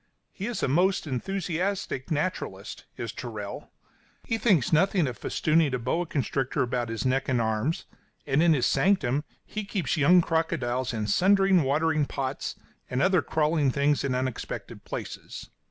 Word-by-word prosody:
He 200 Hz, -, -5 dB
is 240 Hz, -, -3 dB
a -, -, +3 dB
most 180 Hz, +8 st, +2 dB
enthusiastic 175 Hz, +1 st, -2 dB
naturalist, 180 Hz, +4 st, -3 dB
is -, -, -4 dB
Tyrrell. -, -, -7 dB, 0.5 s
He 225 Hz, -1 st, -2 dB
thinks 190 Hz, -, +3 dB
nothing 180 Hz, +1 st, +3 dB
of 125 Hz, -3 st, -3 dB
festooning 155 Hz, +4 st, +1 dB
a -, -, 0 dB
boa 145 Hz, +9 st, -1 dB
constrictor 135 Hz, -1 st, -1 dB
about 120 Hz, -1 st, -2 dB
his 115 Hz, 0 st, -3 dB
neck 130 Hz, +1 st, +1 dB
and 125 Hz, -2 st, +2 dB
arms, 110 Hz, +7 st, -1 dB, 0.4 s
and 140 Hz, +1 st, +2 dB
in 170 Hz, -1 st, +5 dB
his 130 Hz, -5 st, +2 dB
sanctum 150 Hz, -8 st, +2 dB, 0.2 s
he 215 Hz, -, -5 dB
keeps 185 Hz, -, -2 dB
young 170 Hz, +5 st, +6 dB
crocodiles 140 Hz, -7 st, -1 dB
in 110 Hz, -3 st, -2 dB
sundry 195 Hz, -, +3 dB
watering 155 Hz, -1 st, +2 dB
pots, 135 Hz, 0 st, -3 dB, 0.3 s
and 125 Hz, -, -1 dB
other 185 Hz, +1 st, +4 dB
crawling 150 Hz, -2 st, +1 dB
things 140 Hz, +2 st, +1 dB
in 135 Hz, -2 st, 0 dB
unexpected 130 Hz, -1 st, -4 dB
places. -, -, -7 dB
150 Hz, 155 wpm, -27 LUFS, 130-180 Hz, 0.5 s, young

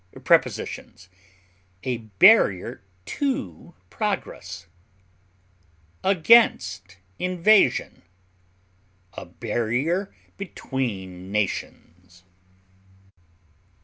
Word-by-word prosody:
Prepositions: 95 Hz, -, 0 dB, 0.7 s
A 125 Hz, -2 st, -2 dB, 0.2 s
barrier 190 Hz, -, +5 dB, 0.2 s
to 180 Hz, -, -4 dB, 0.2 s
progress, -, -, -4 dB, 1.4 s
against 155 Hz, -, +3 dB, 0.2 s
invasion; 185 Hz, +3 st, +2 dB, 1.1 s
a -, -, -9 dB
barrier 120 Hz, -, -2 dB, 0.3 s
between 100 Hz, -, -5 dB
nations. 90 Hz, -3 st, -5 dB
115 Hz, 50 wpm, -24 LUFS, -, 1.4 s, barrier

